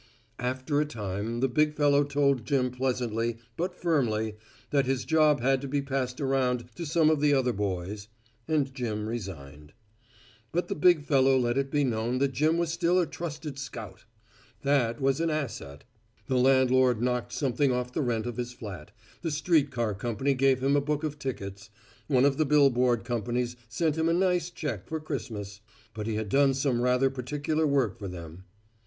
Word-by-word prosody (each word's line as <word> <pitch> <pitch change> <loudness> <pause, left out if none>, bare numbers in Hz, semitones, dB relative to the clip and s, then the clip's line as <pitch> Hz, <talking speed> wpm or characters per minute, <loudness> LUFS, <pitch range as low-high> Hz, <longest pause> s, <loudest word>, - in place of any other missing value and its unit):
After 130 +4 -1
a - - +1
time 110 -2 -4
the 135 - +3
big 150 +4 +1
fellow 145 -1 +4
told 140 -3 +1
Jim 130 -1 +1
pleasantly, 120 -3 -1 0.2
but 180 +2 -2
firmly, 115 -12 0 0.4
that 140 -3 +2
his 130 -1 0
job 155 -4 +3
had 135 +1 +2
to 140 - -5
be 140 +2 0
passed 130 -2 -2
around 130 -3 0
to 170 +6 -6
some 160 0 +4
of 155 -2 +1
the 145 -1 +4
other 125 -2 +1
boys, 100 +1 -3 0.4
and 145 -4 0
Jim 110 -5 -3
resigned. 75 -10 -7 0.8
But 175 +2 -1
the - - -1
big 160 0 +4
fellow 135 -2 +4
let 120 -1 +1
it 135 0 0
be 145 0 +1
known 120 -1 0
that 135 +1 +1
Jim 155 +6 +2
was 170 -1 0
still 175 +1 +2
a 175 - +2
trusted 155 -4 -6
scout. 115 -6 -8 0.6
That 130 -5 +2
was 135 +2 +1
an 165 - +1
asset. 125 - -4 0.4
The 130 -2 0
landlord 130 -2 +4
knocked 125 0 -1
something 135 0 +1
off 125 0 -2
the 155 - 0
rent 120 -4 -1
of 120 -2 -5
his 125 0 -4
flat, 95 -10 -8 0.3
the 165 - -2
street 150 -1 +2
car 120 -5 -1
company 120 +7 -1
gave 130 0 +2
him 140 +1 +3
a 145 - +3
book 150 +1 -2
of 150 -1 -3
tickets, 105 -5 -6 0.4
one 130 -2 +4
of 140 -1 +2
the 155 - +2
bill 145 -1 +5
board 120 -2 +2
companies 120 +1 -2
sent 160 +6 0
him 160 +1 +2
a - - +3
nice 180 -1 +1
check 130 - -5
for 160 - -3
Christmas; 110 -9 -6 0.3
but 105 -1 -5
he 110 - -1
had 110 0 -2
done 135 +2 +4
some 130 -3 0
rather 125 +2 +3
particular 145 +4 -1
work 130 -6 +1
for 100 - -5
them. 85 0 -9
130 Hz, 185 wpm, -28 LUFS, 115-145 Hz, 0.8 s, bill